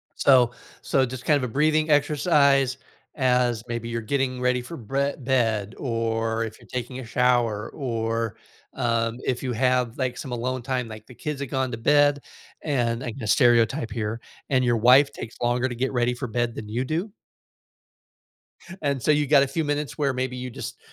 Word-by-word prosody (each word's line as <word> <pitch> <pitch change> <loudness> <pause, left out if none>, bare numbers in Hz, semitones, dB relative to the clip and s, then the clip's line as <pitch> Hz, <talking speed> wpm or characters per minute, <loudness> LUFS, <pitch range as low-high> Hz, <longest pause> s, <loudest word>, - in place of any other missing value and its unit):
So 125 -3 +5 0.3
so 135 -1 +2
just 125 0 -8
kind 150 - +4
of 135 - -3
a - - -14
breathing 155 +2 +2
exercise, 145 -3 +3 0.4
as 125 -4 +1
maybe 120 -1 -4
you're 115 0 -3
getting 130 +2 -1
ready 125 0 +1
for 165 +7 -8
brea 140 +5 -1
bed, 115 -5 0
or 115 -2 -1
if 110 -1 -7
you're - - -18
taking 125 +1 -4
a 130 - -7
shower, 120 -3 +1
or, 115 -4 -2 0.4
um, 115 -1 0
if 125 -1 -1
you 125 -2 -2
have, 125 -1 +1
like, 130 -2 -2
some 135 - -6
alone 125 +1 -2
time, 125 -1 -2
like 110 -1 -10
the 125 - -13
kids 150 +1 -4
have 140 - -4
gone 130 -1 -1
to 115 - -4
bed, 145 +3 +4 0.4
and 120 -5 -1
I 125 - -3
can 135 - -10
just 110 -3 +2
stereotype 120 +1 +3
here, 115 0 -3 0.3
and 130 -2 +2
your 120 -2 +2
wife 130 +5 +6
takes 110 - -8
longer 120 +1 +1
to 125 - -5
get 130 +3 -1
ready 120 0 +1
for 125 +1 -5
bed 120 +1 -1
than 105 -2 -8
you 120 +4 -2
do? 170 +9 -2 1.7
And 140 -3 -1
so, 155 - +3
you 150 -1 +2
got 140 -1 +6
a - - -1
few 160 +4 -2
minutes 145 -3 -2
where 140 -3 +1
maybe 130 0 -3
you 125 0 -5
just 115 - -7
125 Hz, 195 wpm, -25 LUFS, 115-140 Hz, 1.7 s, wife